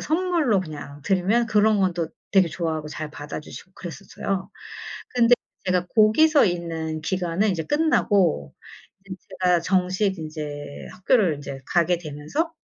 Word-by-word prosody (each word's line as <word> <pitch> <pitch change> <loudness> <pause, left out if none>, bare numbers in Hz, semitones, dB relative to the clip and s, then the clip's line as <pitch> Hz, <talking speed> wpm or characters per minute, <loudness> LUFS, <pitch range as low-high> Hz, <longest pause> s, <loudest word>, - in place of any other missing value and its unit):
선물로 320 - +1
그냥 145 -4 -8
드리면 195 +8 +2
그런 215 0 +3
건 185 -2 +2
또 170 -2 -2 0.2
되게 190 -2 +5
좋아하고 160 -1 -3
잘 155 0 -6
받아 145 +1 -6
주시고 180 +4 -12
그랬었어요. 190 +2 -5 0.7
근데 245 0 +5 0.3
제가 180 -1 +1
거기서 275 +7 +5
있는 165 -3 -3
기간은 185 +3 0
이제 165 -3 -2
끝나고 200 - +2 0.5
이제 190 -1 -7 0.3
제가 180 -1 +4
정식 185 +2 +1
인제 150 -2 -7
학교를 185 - +2
인제 140 -1 -7
가게 175 0 +2
되면서 155 - -3
180 Hz, 305 characters per minute, -24 LUFS, 155-210 Hz, 0.7 s, 되게